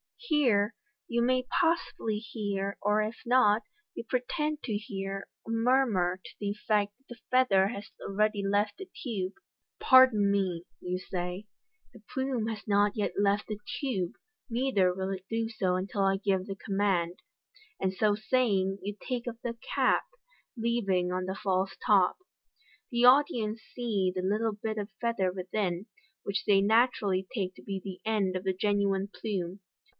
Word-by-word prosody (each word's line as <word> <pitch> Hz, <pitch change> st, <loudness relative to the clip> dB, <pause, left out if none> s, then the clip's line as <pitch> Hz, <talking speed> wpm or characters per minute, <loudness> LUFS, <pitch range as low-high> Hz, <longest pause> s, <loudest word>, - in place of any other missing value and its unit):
Here 240 Hz, -, +2 dB, 0.3 s
you 235 Hz, 0 st, 0 dB
may 255 Hz, +1 st, +2 dB, 0.2 s
possibly 325 Hz, -10 st, +1 dB
hear, 200 Hz, -3 st, -3 dB
or 210 Hz, +1 st, +3 dB
if 215 Hz, +2 st, -4 dB
not, 235 Hz, -3 st, +4 dB, 0.3 s
you -, -, -6 dB
pretend 300 Hz, +6 st, -2 dB
to 225 Hz, -, -2 dB
hear, 195 Hz, -2 st, -5 dB, 0.2 s
a -, -, -10 dB
murmur 225 Hz, -6 st, +2 dB
to -, -, -10 dB
the 205 Hz, -1 st, -1 dB
effect 205 Hz, -1 st, 0 dB
that 270 Hz, -, -35 dB
the 240 Hz, -2 st, -10 dB
feather 225 Hz, -7 st, +4 dB
has 210 Hz, 0 st, -6 dB
already 210 Hz, 0 st, 0 dB
left 205 Hz, +1 st, +1 dB
the 385 Hz, -, -8 dB, 0.2 s
tube. 200 Hz, -7 st, -2 dB, 0.3 s
" -, -, -60 dB
Pardon 245 Hz, -6 st, +6 dB
me," 185 Hz, -4 st, 0 dB, 0.2 s
you 180 Hz, 0 st, -2 dB
say, 180 Hz, +2 st, -4 dB, 0.3 s
" 440 Hz, -, -41 dB
the 225 Hz, -, -14 dB
plume 260 Hz, -4 st, -1 dB
has 220 Hz, -2 st, -5 dB
not 205 Hz, 0 st, +3 dB
yet 210 Hz, -2 st, -1 dB
left 200 Hz, +1 st, +2 dB
the 215 Hz, -1 st, -4 dB, 0.2 s
tube, 195 Hz, -, -1 dB, 0.4 s
neither 230 Hz, -7 st, +2 dB
will 190 Hz, +1 st, -3 dB
it 190 Hz, -1 st, -5 dB
do 225 Hz, 0 st, -1 dB
so 190 Hz, -5 st, 0 dB
until 195 Hz, +2 st, -2 dB
I 195 Hz, 0 st, +3 dB
give 195 Hz, -2 st, 0 dB
the 195 Hz, -, -4 dB
command," 195 Hz, -4 st, 0 dB, 0.6 s
and 190 Hz, 0 st, 0 dB
so 205 Hz, +1 st, +2 dB
saying, 205 Hz, -4 st, +1 dB
you 205 Hz, +1 st, -4 dB
take 245 Hz, -1 st, -2 dB
off 235 Hz, -1 st, -4 dB
the 235 Hz, -1 st, -3 dB, 0.2 s
cap, -, -, +3 dB, 0.5 s
leaving 200 Hz, -6 st, +1 dB
on 185 Hz, 0 st, -1 dB
the 190 Hz, +1 st, -3 dB
false 190 Hz, -1 st, 0 dB
top. 195 Hz, -4 st, +4 dB, 0.7 s
The 240 Hz, 0 st, +3 dB
audi 270 Hz, 0 st, +6 dB
ence 215 Hz, +1 st, -3 dB
see 210 Hz, -7 st, 0 dB
the 185 Hz, -, -1 dB
little 215 Hz, +3 st, +1 dB
bit 215 Hz, +1 st, -4 dB
of 205 Hz, 0 st, -4 dB
feather 230 Hz, -6 st, +1 dB
within, 185 Hz, +1 st, -2 dB, 0.4 s
which 200 Hz, -, -2 dB
they 195 Hz, -1 st, +5 dB
naturally 205 Hz, -3 st, +2 dB
take 190 Hz, -4 st, -1 dB
to -, -, -15 dB
be 195 Hz, -1 st, -4 dB
the 190 Hz, -2 st, -7 dB
end 195 Hz, -4 st, +1 dB
of 185 Hz, -, -2 dB
the 190 Hz, -1 st, 0 dB
genuine 200 Hz, 0 st, +1 dB
plume. 195 Hz, -3 st, -4 dB
205 Hz, 170 wpm, -30 LUFS, 195-230 Hz, 0.7 s, Pardon